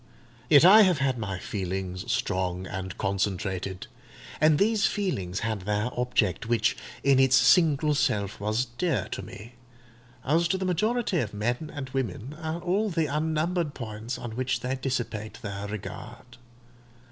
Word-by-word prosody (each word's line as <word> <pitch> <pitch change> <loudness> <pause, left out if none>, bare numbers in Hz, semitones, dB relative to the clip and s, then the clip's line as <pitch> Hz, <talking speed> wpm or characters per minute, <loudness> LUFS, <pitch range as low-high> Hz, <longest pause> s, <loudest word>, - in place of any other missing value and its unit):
Yet 150 +1 +7
I 210 +4 +9
have 185 -5 +4
had 135 -3 0
my 100 -4 -3
feelings, 95 0 -4
strong 90 -1 -1
and 95 0 -6
concentrated; 95 -1 -2 0.5
and 155 0 +5
these 215 +2 +3
feelings 100 - -2
had 110 -2 -2
their 105 +5 -1
object; 120 -6 0
which, 120 -1 +2 0.3
in 135 -1 +4
its 130 0 +5
single 155 -2 +4
self, 100 -8 0
was 110 +4 0
dear 140 +8 -1
to - - -4
me, 115 +4 -11 0.7
as 165 +5 +3
to 190 - 0
the 190 - -3
majority 215 +2 +1
of 105 -6 -3
men 120 +8 -2
and 135 -3 -6
women, 130 +1 -3
are 160 +1 -3
all 200 +5 0
the 165 -3 0
unnumbered 155 +2 -1
points 115 +1 -5
on 120 - -6
which 130 +3 -2
they 125 +1 -2
dissipate 120 -5 -3
their 100 -1 -5
regard. 110 +4 -8
125 Hz, 150 wpm, -27 LUFS, 105-155 Hz, 0.7 s, I